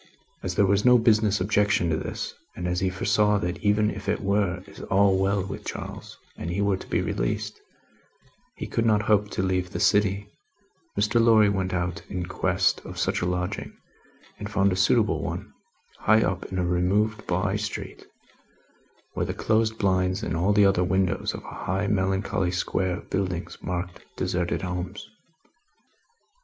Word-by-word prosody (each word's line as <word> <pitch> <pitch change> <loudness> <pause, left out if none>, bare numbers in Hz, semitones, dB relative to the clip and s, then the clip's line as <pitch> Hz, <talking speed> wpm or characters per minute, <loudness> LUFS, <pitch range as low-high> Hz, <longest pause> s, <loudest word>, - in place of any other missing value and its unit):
As - - -3
there 100 - +4
was 100 +1 +2
no 125 0 +7
business 110 -3 +3
objection 100 -2 +2
to - - +2
this, - - -4 0.2
and 90 - -4
as 90 0 0
he 95 0 +1
foresaw 105 +3 +2
that 90 -3 -3
even 105 +1 +2
if 100 0 -6
it 105 - +1
were 100 -3 0 0.3
all 100 0 +4
well 95 0 +1
with 100 - -7
Charles, - - -7 0.2
and 80 - -5
he 90 +3 -2
were 100 -1 +2
to - - -11
be - - 0
released, - - -2 0.9
he - - -5
could 115 - -1
not 110 -2 +3
hope 105 -1 +2
to 95 - -2
leave 90 -1 0
the - - -5
city, 100 0 +2 0.7
Mr. 105 +3 +3
Lorry 110 -3 +6
went 95 -2 -1
out 90 -1 -2
in 90 -2 -3
quest 90 +1 +1
of - - -9
such - - 0
a 90 - 0
lodging, 90 0 -3 0.6
and 105 0 -5
found 100 -1 +2
a - - -1
suitable 105 +3 +2
one, - - -5 0.5
high 110 +1 +4
up 95 +1 -2
in 95 - -5
a 90 - +1
removed 95 +5 +1
by 95 +3 0
street 105 0 -5 1.1
where - - -2
the - - -3
closed 110 0 +1
blinds 95 -3 +1
in 80 - -2
all 90 +5 +2
the 105 -1 +5
other 95 -2 +3
windows 95 0 0
of - - -8
a - - -8
high 95 +3 0
melancholy 95 -1 0
square 90 0 -1
of - - -13
buildings 90 -3 -2
marked 90 0 -4
deserted 90 0 -1
homes. 90 +2 -4
95 Hz, 175 wpm, -26 LUFS, 90-105 Hz, 1.1 s, no